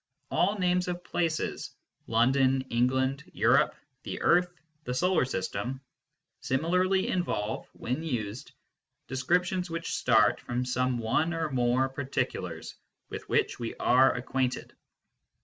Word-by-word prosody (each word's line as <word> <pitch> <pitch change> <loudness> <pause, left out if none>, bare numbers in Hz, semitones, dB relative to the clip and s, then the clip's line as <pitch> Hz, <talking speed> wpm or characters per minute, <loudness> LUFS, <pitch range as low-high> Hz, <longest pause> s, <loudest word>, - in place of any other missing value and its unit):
All 200 +4 +2
names 180 -1 +1
of 175 0 -4
places 165 -2 -2 0.3
London, 130 +3 +3
England, 130 +3 +1
Europe, - - +3 0.3
the - - -5
earth, 180 +1 +4 0.3
the 125 -4 -3
Solar 180 -1 +2
System 120 +3 -3 0.6
similarly 180 +7 +1
involve, 110 - -2
when 125 +6 -3
used, 120 -4 -4 0.6
descriptions 180 +7 0
which 165 0 -4
start - - +3
from 120 +1 -2
some 125 0 0
one 150 +9 0
or 160 -2 -2
more 125 +1 +2
particulars 135 0 -3 0.4
with - - -7
which - - +1
we 115 -1 -4
are 130 +2 +4
acquainted. 130 0 -2
135 Hz, 115 wpm, -29 LUFS, 125-175 Hz, 0.6 s, earth